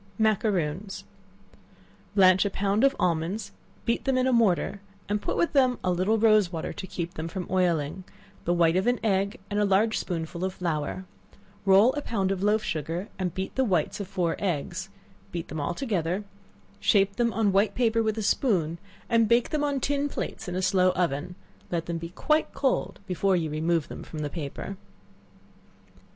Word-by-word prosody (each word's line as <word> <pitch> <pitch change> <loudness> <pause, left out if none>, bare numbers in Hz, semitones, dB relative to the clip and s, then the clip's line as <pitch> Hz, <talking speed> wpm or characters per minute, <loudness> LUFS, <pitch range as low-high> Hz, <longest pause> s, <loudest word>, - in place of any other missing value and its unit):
Macaroons. 195 -4 0 1.1
Blanch 185 -2 +6
a 200 - 0
pound 200 +3 0
of 275 0 +4
almonds, 175 +5 -1 0.3
beat 230 - 0
them 265 -1 +2
in 255 - +2
a 260 - +2
mortar, 200 -3 +2 0.3
and 205 0 -1
put - - -2
with 340 - +1
them 255 -3 +4
a 185 - +1
little 185 +5 +2
rose 215 -4 +4
water 165 -3 -4
to 190 - -7
keep 170 -1 -4
them 160 +1 -4
from 180 +1 -5
oiling, 175 -2 +1 0.4
the 175 - +2
white 170 -1 +3
of 190 +4 +1
an 245 0 +2
egg, 200 +1 +1
and 205 - +1
a - - +3
large 205 +3 +2
spoonful 170 0 -4
of 185 0 -2
flour; 170 +1 -2 0.6
roll 200 +6 +6
a 290 - -2
pound 195 -8 -1
of 190 -1 -2
loaf 210 +2 +2
sugar, 165 +6 -3
and 180 -3 -2
beat 190 0 -3
the 265 - +1
whites 180 -9 0
of 200 - -4
four 175 -3 -1
eggs; 185 +1 -2 0.4
beat 170 -2 -5
them 155 +1 -4
all 145 - -2
together; 190 - -1 0.6
shape 200 -1 +3
them 235 -1 +2
on 215 -2 +2
white 200 +3 +2
paper 230 -2 +2
with 220 -1 0
a 220 - -2
spoon, 175 - +1 0.3
and 230 -2 +3
bake 235 +1 +3
them 300 -1 0
on 285 -2 0
tin 285 +2 0
plates 220 - -5
in 180 - -4
a 185 - -1
slow 185 0 +4
oven; 175 -1 -1 0.3
let 170 -2 -2
them 170 -1 -3
be 170 0 -6
quite 305 - +1
cold 270 -3 0
before 190 0 +1
you 160 -3 -1
remove 160 +1 0
them - - -8
from 160 - -9
the 145 - -4
paper. 165 +5 -5
190 Hz, 190 wpm, -27 LUFS, 170-220 Hz, 1.1 s, Blanch